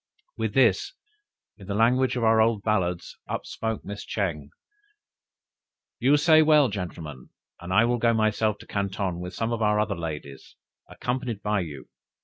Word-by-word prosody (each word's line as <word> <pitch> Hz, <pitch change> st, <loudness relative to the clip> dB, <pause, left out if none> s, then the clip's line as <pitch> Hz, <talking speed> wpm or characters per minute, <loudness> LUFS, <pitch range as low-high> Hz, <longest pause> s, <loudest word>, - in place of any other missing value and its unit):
With -, -, -3 dB
this, -, -, +3 dB, 0.6 s
in 100 Hz, -3 st, -13 dB
the 100 Hz, -, -2 dB
language 125 Hz, +4 st, +3 dB
of 120 Hz, -, -1 dB
our 110 Hz, 0 st, +5 dB
old 110 Hz, -2 st, +2 dB
ballads, 90 Hz, -5 st, -1 dB
upspoke 110 Hz, -2 st, -4 dB
Mrs. 100 Hz, +1 st, -7 dB
Ching. 80 Hz, -9 st, -3 dB, 1.5 s
"You 135 Hz, +4 st, +4 dB
say 155 Hz, +1 st, +6 dB
well, 150 Hz, -4 st, +5 dB
gentlemen! 80 Hz, -9 st, -7 dB, 0.3 s
and 90 Hz, +1 st, -8 dB
I 110 Hz, +5 st, +5 dB
will 120 Hz, 0 st, 0 dB
go 115 Hz, 0 st, +3 dB
myself 110 Hz, -1 st, +1 dB
to -, -, -13 dB
Canton 95 Hz, -3 st, -2 dB
with 90 Hz, 0 st, -7 dB
some 115 Hz, +1 st, -1 dB
other 105 Hz, -2 st, +1 dB
of 105 Hz, -1 st, 0 dB
our -, -, -1 dB
ladies, 75 Hz, -5 st, -7 dB, 0.3 s
accompanied 125 Hz, -4 st, -4 dB
by 105 Hz, 0 st, +1 dB
you!" 75 Hz, -7 st, -7 dB
105 Hz, 155 wpm, -26 LUFS, 90-115 Hz, 1.5 s, say